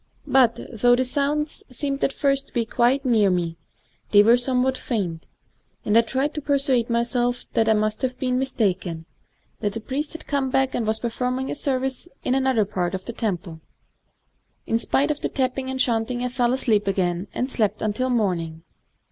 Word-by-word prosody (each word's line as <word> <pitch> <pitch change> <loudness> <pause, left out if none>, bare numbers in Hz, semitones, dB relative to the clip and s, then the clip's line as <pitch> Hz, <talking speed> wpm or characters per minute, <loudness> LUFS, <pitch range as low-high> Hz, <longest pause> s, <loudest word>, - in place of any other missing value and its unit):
But, 250 -4 +3
though 245 +2 +4
the 255 +1 +1
sounds 290 +3 -1
seemed 275 +2 -3
at - - +2
first 275 -1 +1
to - - -17
be 235 -2 +1
quite 250 +5 +2
near 220 -5 +4
me, 170 -2 -1 0.5
they 205 -1 +7
were 230 +3 +6
somewhat 255 +1 +1
faint; 185 -11 -3 0.6
and 210 - +1
I 230 - +8
tried 265 +6 -1
to 300 - -4
per 285 0 +2
suade 260 -4 +2
myself 240 +1 0
that 225 -1 +2
I - - +6
must 215 0 0
have 255 -1 -2
been 255 -1 0
mistaken, 190 -10 -1 0.3
— - - -40
that 205 -2 -1
the 225 - -3
priest 275 +6 -4
had 325 - -8
come 280 -2 0
back 265 0 +1
and 225 - -1
was 220 0 +2
perform 250 +2 -2
ing 265 +1 -3
a - - -1
service 265 +1 -2 0.2
in 255 - +1
some 265 0 +1
other 230 -6 +3
part 185 -2 -2
of 190 - -7
the 235 - -5
temple. 175 -8 -3 1.0
In 225 - +1
spite 285 +5 +1
of 295 - -3
the - - -2
tapping 260 0 -1
and 265 0 -3
chanting 240 0 +1
I 250 - 0
fell 245 -1 +1
asleep 220 -6 +1
again, 185 -1 0
and 255 +2 -2
slept 215 -6 0
until 215 +5 0
morning. 170 -9 -1
245 Hz, 200 wpm, -23 LUFS, 210-265 Hz, 1.0 s, I